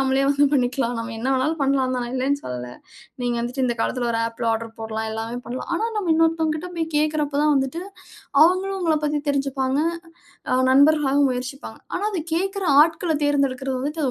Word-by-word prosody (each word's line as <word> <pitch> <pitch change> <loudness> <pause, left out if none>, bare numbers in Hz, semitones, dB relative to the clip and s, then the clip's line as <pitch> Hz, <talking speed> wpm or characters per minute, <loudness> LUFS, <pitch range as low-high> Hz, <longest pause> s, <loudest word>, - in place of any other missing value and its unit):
நம்மளே 270 0 +2
வந்து 285 0 +4
பண்ணிக்கலாம். 245 -2 0
நம்ம 230 0 -6
என்ன 260 - -2
வேணாலு 300 +5 +1
பண்லாந்தா 260 -2 +1
நான் 240 - -6
இல்லனு 280 +2 0
சொல்ல. 125 -1 -5 0.6
நீங்க 240 -1 0
வந்துட்டு 250 +2 -2
இந்த 240 - 0
காலத்துல 245 -2 -1
ஒரு 225 - 0
ஆப்ல 230 +1 -4
ஆடர் 225 0 -4
போடலாம். 220 0 -3
எல்லாமே 225 +2 -4
பண்ணலாம். 250 +2 -6
ஆனா 435 - 0
நம்ம 405 -4 -2
இன்னொருத்தங்க 320 -1 +2
கிட்ட 325 - -6
போய் 330 -1 -1
கேக்குறப்ப 300 -1 0
தான் 300 - +4
வந்துட்டு 270 +4 -1 0.6
அவங்களும் 375 +3 +3
உங்கள 330 -3 +2
பத்தி 295 0 0
தெரிஞ்சுப்பாங்க. 275 -1 0 0.7
அ - - +4 0.2
நண்பர்களாக 285 0 +4
முயற்சிப்பாங்க. 255 +3 -5 0.2
ஆனா 410 - -2
அத 390 - -3
கேக்குற 385 +3 -1 0.2
ஆட்கள 325 +1 +2
தேர்ந்தெடுக்கிறது 275 -2 0
வந்துட்டு 300 +4 -3
அது 260 - +1
275 Hz, 180 wpm, -23 LUFS, 250-310 Hz, 0.7 s, வந்து